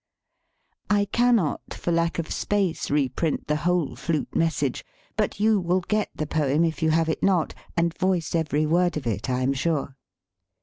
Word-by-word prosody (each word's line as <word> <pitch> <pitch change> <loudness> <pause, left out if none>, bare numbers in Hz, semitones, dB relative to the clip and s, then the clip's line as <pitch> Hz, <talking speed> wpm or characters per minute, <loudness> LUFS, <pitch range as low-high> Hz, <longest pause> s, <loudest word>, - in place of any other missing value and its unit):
I 205 -1 +3
cannot, 230 - +1
for 175 - -2
lack 170 0 +1
of 165 -2 -3
space, 200 -5 -1
reprint 145 +2 0
the 150 0 0
whole 170 -1 0
flute 160 -4 -2
message, 145 -5 0 0.3
but - - -1
you 215 0 +4
will 180 +1 +1
get 210 +3 -1
the 155 - -2
poem, 150 0 +1
if 165 -1 -1
you 160 - +3
have 165 +1 +2
it 160 - -1
not, 185 -5 +2 0.2
and 170 0 +2
voice 185 -3 0
every 155 -2 +1
word 175 +1 +2
of 150 - -5
it, 115 +2 -2
I 125 0 0
am 130 +2 +2
sure. 140 -1 -1
165 Hz, 175 wpm, -25 LUFS, 150-180 Hz, 0.3 s, you